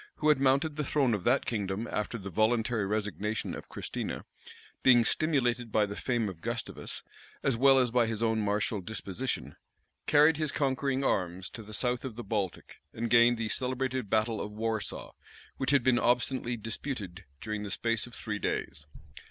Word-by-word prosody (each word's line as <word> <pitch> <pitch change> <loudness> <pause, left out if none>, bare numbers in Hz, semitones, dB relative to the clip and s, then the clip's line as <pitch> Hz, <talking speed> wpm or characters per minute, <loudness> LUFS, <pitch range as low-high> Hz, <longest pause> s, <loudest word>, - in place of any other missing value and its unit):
who 155 - +1
had 150 -3 +5
mounted 140 +3 +2
the 150 - 0
throne 135 -3 +2
of 100 -4 -2
that 125 +7 +3
kingdom 105 0 -2
after 105 +2 -2
the 100 -2 -7
voluntary 110 +1 +1
resignation 105 0 -2
of - - -8
Christina, - - -5 0.6
being 120 -3 +6
stimulated 125 -7 +1
by 105 -1 +3
the 100 0 -6
fame 120 -2 0
of 90 -4 -7
Gustavus, - - -4 0.4
as 135 - +2
well 135 +3 +6
as 125 -3 +3
by 120 -1 +3
his 110 0 -2
own 110 -1 +2
martial 105 0 0
disposition, 110 +4 -4 0.5
carried 150 +1 +6
his 155 -2 -1
conquering 135 -1 0
arms 90 -5 -1
to 115 - -8
the 110 0 -11
south 125 +1 0
of 130 -5 -5
the 120 - -6
Baltic, 100 -6 -3
and 115 0 -3
gained 120 0 +6
the 115 -1 -2
celebrated 130 -1 -1
battle 110 +1 +1
of 105 - -5
Warsaw, 110 0 -3 0.5
which 135 - -1
had 140 -3 +4
been 125 -1 +4
obstinately 125 0 +1
disputed 105 - -5
during 110 -1 -4
the 105 - -5
space 115 +3 -1
of 120 - -11
three 105 -1 -4
days. 75 -6 -3
115 Hz, 175 wpm, -30 LUFS, 105-130 Hz, 0.6 s, being